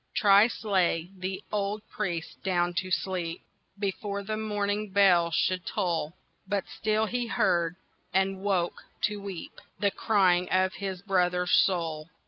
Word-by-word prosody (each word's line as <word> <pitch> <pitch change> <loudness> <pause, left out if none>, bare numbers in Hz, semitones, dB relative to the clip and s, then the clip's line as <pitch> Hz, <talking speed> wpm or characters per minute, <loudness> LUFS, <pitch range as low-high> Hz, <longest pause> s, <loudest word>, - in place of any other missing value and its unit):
Thrice 205 +3 +5
lay 180 -4 +1
the 190 +1 -4
old 210 +1 -2
priest 170 -2 -4
down 175 -2 +1
to 185 +1 -5
sleep 180 -3 -2 0.3
Before 200 0 -3
the 215 +2 -3
morning 210 -1 -1
bell 185 -4 +5
should 180 +2 +1
toll; 170 -3 -2 0.3
But 200 -1 0
still 215 0 0
he 240 +2 -2
heard—and 185 -1 0
woke 190 -3 -1 0.2
to 210 -1 0
weep— 195 -4 -8 0.2
The 200 +1 +1
crying 185 -5 +2
of 185 0 +2
his 190 -2 -5
brother's 180 -2 +1
soul. 165 -4 +2
190 Hz, 130 wpm, -28 LUFS, 180-205 Hz, 0.3 s, Thrice